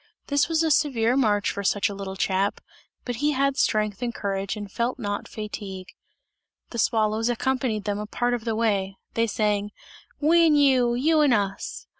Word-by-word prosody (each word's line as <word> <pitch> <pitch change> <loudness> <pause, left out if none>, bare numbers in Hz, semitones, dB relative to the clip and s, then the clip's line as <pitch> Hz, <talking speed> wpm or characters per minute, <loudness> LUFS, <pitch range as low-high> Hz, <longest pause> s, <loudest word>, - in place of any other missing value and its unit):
This 285 +2 +2
was 325 0 +2
a 320 - +1
severe 255 -6 +2
march 210 -6 +2
for 200 - -5
such 200 +1 +2
a 205 - -5
little 195 -1 -6
chap, 195 +1 0 0.5
but 245 -2 -3
he 295 +3 +1
had 275 0 +1
strength 215 -4 0
and 245 -1 -1
courage, 195 -2 -3
and 205 -2 -7
felt 235 +4 -1
not 205 -4 -4
fatigue. 200 -3 -7 0.8
The 235 - -4
swallows 220 +1 +1
accompanied 240 -3 -1
them 205 -1 -2
a 210 - -5
part 245 +3 -1
of 240 -2 -2
the 225 -1 -1
way. 200 -4 0 0.2
They 230 0 +1
sang: 210 -1 0 0.5
"We 330 +3 +5
and 300 -2 +4
you! 255 -4 +4
You 310 +5 +3
and 280 -5 +4
us!" 200 -1 -3
225 Hz, 185 wpm, -25 LUFS, 205-260 Hz, 0.8 s, We